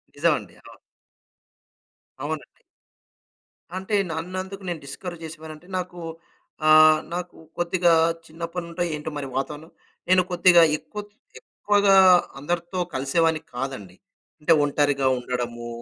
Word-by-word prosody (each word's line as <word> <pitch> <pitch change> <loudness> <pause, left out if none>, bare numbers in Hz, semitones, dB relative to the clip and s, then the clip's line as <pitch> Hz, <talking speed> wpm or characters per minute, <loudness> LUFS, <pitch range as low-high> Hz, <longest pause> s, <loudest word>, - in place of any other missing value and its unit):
నిజమండి. - - 0
అవును. - - -15 1.4
అవునండి. - - -4 1.3
అంటే 190 +3 -2 0.2
నన్నందుకు 185 +4 -5
నేను 170 -3 -3
డిస్కరేజ్ 170 +4 -8
చేసేవానంటే 160 +1 -10
నాకు. 180 -1 -5 0.7
ఆహ్, 155 0 +7
నాకు 180 0 -5 0.2
కొద్దిగా 175 0 +2 0.4
చిన్నప్పటి 170 +2 -6
నుంచో 170 +1 -3
ఏంటో 150 +1 -5
మరి 140 -2 -4
వాతావరణం 150 +4 -4 0.4
నేను 185 0 +6
కొద్దిగా 175 -1 +6 0.2
ఎక్కువ 160 +8 -8 0.4
ఎక్కువగా 205 -1 +1 0.5
అందరితో 175 +4 -3
కలిసేవాడిని 155 +4 +1
కాదండి. 120 -8 -5 0.4
అంటే 160 +2 +4
ఒంటరిగా 145 -1 +1
ఉండడము, 120 -1 -4
165 Hz, 100 wpm, -24 LUFS, 145-180 Hz, 1.4 s, ఆహ్